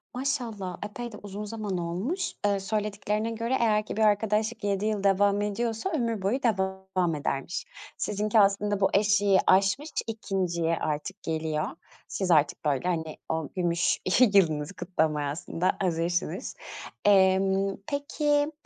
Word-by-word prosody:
Maşallah. 230 Hz, -8 st, -3 dB
Epey 240 Hz, +3 st, -6 dB
de 210 Hz, -, -9 dB
uzun 205 Hz, +1 st, -7 dB
zaman 210 Hz, -3 st, -4 dB
olmuş. 185 Hz, -, -2 dB
Eee, 200 Hz, -1 st, +2 dB
söylediklerine 210 Hz, +2 st, -2 dB
göre 230 Hz, +3 st, -1 dB
eğer 215 Hz, -2 st, +2 dB
ki -, -, -6 dB
bir -, -, +1 dB
arkadaşlık 215 Hz, +1 st, +2 dB
7 200 Hz, 0 st, 0 dB
yıl 215 Hz, -2 st, -1 dB
devam 200 Hz, +1 st, +3 dB
ediyorsa 225 Hz, -, -2 dB
ömür 230 Hz, -, -1 dB
boyu 240 Hz, +8 st, 0 dB
devam 190 Hz, -5 st, 0 dB
edermiş. 145 Hz, -, -3 dB, 0.3 s
Sizinki 210 Hz, +2 st, +1 dB
aslında 200 Hz, 0 st, +3 dB
bu 195 Hz, -, +3 dB
eşiği 205 Hz, -1 st, +4 dB
aşmış, 195 Hz, +11 st, +3 dB, 0.2 s
2'nciye 180 Hz, -6 st, -1 dB
artık 155 Hz, +6 st, -4 dB
geliyor. 155 Hz, -1 st, -1 dB, 0.4 s
Siz 190 Hz, -3 st, -1 dB
artık, 150 Hz, 0 st, +3 dB
böyle, 145 Hz, +4 st, +1 dB
hani, 160 Hz, -3 st, -2 dB
o 160 Hz, -2 st, -2 dB
gümüş 175 Hz, -1 st, +1 dB, 0.3 s
yılınızı 160 Hz, -3 st, +2 dB
kutlamaya 155 Hz, -5 st, 0 dB
aslında 165 Hz, +4 st, -1 dB
hazırsınız. 175 Hz, -1 st, -1 dB, 0.5 s
Emm, 195 Hz, 0 st, +4 dB
peki, 290 Hz, +1 st, 0 dB
195 Hz, 130 wpm, -27 LUFS, 175-215 Hz, 0.5 s, eşiği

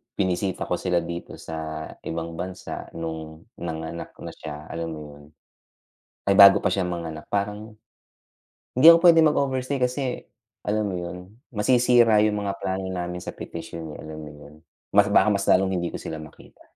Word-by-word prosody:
binisita 95 Hz, 0 st, -1 dB
ko -, -, -2 dB
sila 90 Hz, -2 st, 0 dB
dito 85 Hz, +1 st, -6 dB
sa 80 Hz, -1 st, -6 dB, 0.2 s
ibang 85 Hz, 0 st, -5 dB
bansa, 95 Hz, +1 st, -6 dB
nung 80 Hz, -1 st, -6 dB, 0.2 s
nanganak 80 Hz, 0 st, -6 dB
na -, -, -6 dB
siya, 75 Hz, 0 st, -9 dB
alam 85 Hz, 0 st, -4 dB
mo -, -, -8 dB
yun, 75 Hz, 0 st, -15 dB, 1.1 s
ay 100 Hz, -, +3 dB
bago 100 Hz, -1 st, +9 dB
pa -, -, +2 dB
siya 95 Hz, -2 st, 0 dB
manganak 80 Hz, -3 st, -5 dB
parang 105 Hz, +2 st, -3 dB, 1.0 s
hindi 130 Hz, +5 st, +6 dB
ako 170 Hz, +1 st, +6 dB
pwedeng 165 Hz, -1 st, +7 dB
mag-overstay 135 Hz, -1 st, -1 dB
kasi 125 Hz, +1 st, -1 dB, 0.4 s
alam 105 Hz, 0 st, 0 dB
mo 95 Hz, -, -3 dB
yun, 90 Hz, +2 st, -7 dB, 0.2 s
masisira 120 Hz, -1 st, +4 dB
yung 105 Hz, -1 st, +1 dB
mga 100 Hz, -, -1 dB
plano 95 Hz, 0 st, -2 dB
namin 90 Hz, -1 st, -4 dB
sa -, -, -7 dB
petisyon 80 Hz, -2 st, -7 dB
eh -, -, -13 dB
alam 80 Hz, 0 st, -8 dB
mo 75 Hz, -, -9 dB
yun. 75 Hz, 0 st, -14 dB, 0.4 s
Mas 100 Hz, 0 st, +6 dB
baka 100 Hz, -1 st, +5 dB
mas 100 Hz, -1 st, 0 dB
lalong 95 Hz, 0 st, +3 dB
hindi 85 Hz, -1 st, -1 dB
ko -, -, -6 dB
sila 80 Hz, -, -6 dB
makita. 75 Hz, -, -15 dB
90 Hz, 170 wpm, -24 LUFS, 80-105 Hz, 1.1 s, bago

